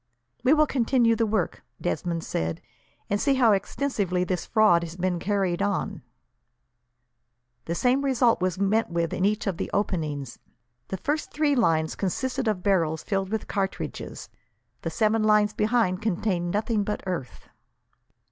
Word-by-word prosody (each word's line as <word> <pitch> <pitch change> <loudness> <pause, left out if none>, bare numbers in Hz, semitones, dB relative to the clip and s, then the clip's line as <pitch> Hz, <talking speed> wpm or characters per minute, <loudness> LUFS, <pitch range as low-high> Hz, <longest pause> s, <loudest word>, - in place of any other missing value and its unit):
"We 275 +5 +5
will 305 0 +5
continue 240 -3 +2
the 225 0 +1
work," 205 -4 -1 0.2
Desmond 170 -2 -2
said, 80 0 -2 0.5
"and 205 +1 0
see 275 -1 +3
how 245 -4 +5
extensively 200 -3 0
this 180 -1 -2
fraud 215 -7 +4
has 170 0 -6
been 180 -1 -1
carried 195 -2 0
on." 200 -1 -1 1.6
The 170 - -2
same 255 +7 +2
result 250 -6 +3
was 185 -1 0
met 200 +3 +1
with 170 -1 -1
in 185 - 0
each 210 +1 0
of 195 -5 -1
the - - -3
openings. 155 - -2 0.5
The 190 - -4
first 295 - -2
three 300 -1 +2
lines 160 -9 +2
consisted 255 +6 -2
of 200 -4 0
barrels 165 -5 +1
filled 195 -2 -1
with 220 0 -3
cartridges; 195 -1 -4 0.5
the - - -3
seven 220 0 +1
lines 210 -1 +4
behind 215 -4 +1
contained 185 -4 -1
nothing 210 +2 0
but 210 +1 -3
earth. 175 -9 -5
200 Hz, 150 wpm, -26 LUFS, 175-225 Hz, 1.6 s, We